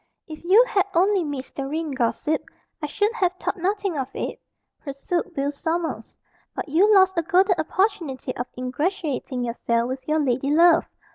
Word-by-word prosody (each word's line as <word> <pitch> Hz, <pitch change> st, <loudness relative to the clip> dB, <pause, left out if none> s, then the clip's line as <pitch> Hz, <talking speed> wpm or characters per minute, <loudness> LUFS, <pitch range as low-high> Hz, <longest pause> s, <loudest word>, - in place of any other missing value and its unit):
"If 310 Hz, -1 st, -9 dB
you 405 Hz, +8 st, +6 dB
had 400 Hz, -5 st, +1 dB
only 380 Hz, +2 st, +3 dB
missed 285 Hz, -4 st, -6 dB
the 275 Hz, -1 st, -3 dB
ring, 315 Hz, +1 st, -3 dB
gossip, 265 Hz, +4 st, -1 dB, 0.4 s
I 300 Hz, -, -2 dB
should 415 Hz, +9 st, 0 dB
have 370 Hz, -6 st, +1 dB
thought 370 Hz, -, -3 dB
nothing 385 Hz, -2 st, -1 dB
of 260 Hz, -, -2 dB
it," -, -, -4 dB, 0.4 s
pursued 330 Hz, +6 st, -3 dB
Will 280 Hz, +1 st, 0 dB
Sommers; 325 Hz, +3 st, -3 dB, 0.4 s
"but -, -, -4 dB
you 355 Hz, +9 st, +4 dB
lost 380 Hz, -3 st, +5 dB
a -, -, +2 dB
golden 370 Hz, +4 st, +3 dB
opportunity 315 Hz, -7 st, -1 dB
of 245 Hz, -, -4 dB
ingratiating 265 Hz, -1 st, -2 dB
yourself 235 Hz, 0 st, -1 dB
with 260 Hz, 0 st, -6 dB
your 310 Hz, +1 st, +2 dB
lady 270 Hz, -1 st, 0 dB
love. 335 Hz, +2 st, +5 dB
315 Hz, 165 wpm, -23 LUFS, 275-370 Hz, 0.4 s, you